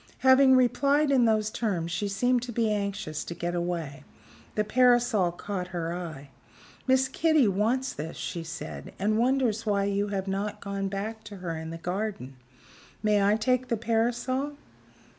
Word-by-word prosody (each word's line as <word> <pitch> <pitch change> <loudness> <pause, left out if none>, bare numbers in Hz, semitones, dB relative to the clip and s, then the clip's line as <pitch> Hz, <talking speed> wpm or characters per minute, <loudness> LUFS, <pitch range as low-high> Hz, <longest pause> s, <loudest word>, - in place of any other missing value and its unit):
Having 260 0 +7
replied 280 +4 +3
in 255 -3 +4
those 215 -1 +2
terms, 180 -9 -2
she 205 +4 -1
seemed 245 +5 +1
to 245 0 -5
be 225 -1 +1
anxious 200 -6 -3
to 170 - -7
get 175 +1 -3
away. 170 -6 -3 0.5
The 210 - +2
parasol 240 -4 +3
caught 180 +1 -5
her 170 -2 -3
eye. 155 -6 -7 0.6
"Miss 260 0 +4
Kitty 310 -1 +3
wants 225 +7 0
this," 155 +3 -6
she 170 - -4
said, 80 - -7
"and 215 +3 +1
wonders 245 -3 +1
why 205 -3 +1
you 200 +1 0
have 195 -1 -3
not 200 +2 -2
gone 200 -1 -3
back 210 +3 -4
to 210 -1 -8
her 180 -3 -4
in 160 0 -6
the 165 - -6
garden. 180 - -4 0.7
May 210 -1 +3
I 200 +1 +4
take 255 +3 +1
the 235 -2 0
parasol?" 240 +5 -1
210 Hz, 165 wpm, -27 LUFS, 180-245 Hz, 0.7 s, Having